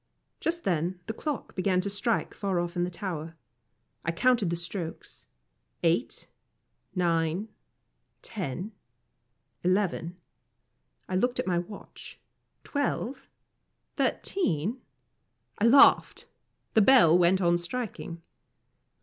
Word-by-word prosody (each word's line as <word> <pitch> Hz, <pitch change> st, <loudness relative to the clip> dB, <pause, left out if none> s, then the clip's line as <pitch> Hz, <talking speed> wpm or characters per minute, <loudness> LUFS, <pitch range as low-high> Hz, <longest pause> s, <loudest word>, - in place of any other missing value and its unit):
Just 340 Hz, +1 st, -2 dB
then 175 Hz, +1 st, -1 dB
the 220 Hz, -, -4 dB
clock 295 Hz, +4 st, -4 dB
began 185 Hz, -1 st, +1 dB
to 195 Hz, -, -3 dB
strike 205 Hz, +3 st, 0 dB
far 195 Hz, -3 st, -1 dB
off 175 Hz, +1 st, -3 dB
in 175 Hz, -, +1 dB
the -, -, -3 dB
tower. 165 Hz, -3 st, -5 dB, 0.7 s
I 165 Hz, -, 0 dB
counted 230 Hz, +1 st, +2 dB
the 170 Hz, -, 0 dB
strokes 170 Hz, -1 st, -5 dB, 0.6 s
eight 170 Hz, +8 st, 0 dB, 0.7 s
nine 170 Hz, +3 st, 0 dB, 0.7 s
ten 185 Hz, -, -5 dB, 0.9 s
eleven 180 Hz, -2 st, 0 dB, 0.9 s
I 185 Hz, -, -3 dB
looked 245 Hz, +6 st, +1 dB
at -, -, 0 dB
my 180 Hz, -2 st, +1 dB
watch 190 Hz, +4 st, -10 dB, 0.4 s
twelve 280 Hz, -3 st, -2 dB, 0.7 s
thirteen 215 Hz, -, 0 dB, 0.8 s
I 210 Hz, -, +3 dB
laughed. 270 Hz, +5 st, +6 dB, 0.5 s
The 220 Hz, -, +5 dB
bell 200 Hz, -8 st, +7 dB
went 180 Hz, +1 st, +4 dB
on 175 Hz, -2 st, +3 dB
striking. 175 Hz, -4 st, -5 dB
185 Hz, 105 wpm, -28 LUFS, 170-220 Hz, 0.9 s, bell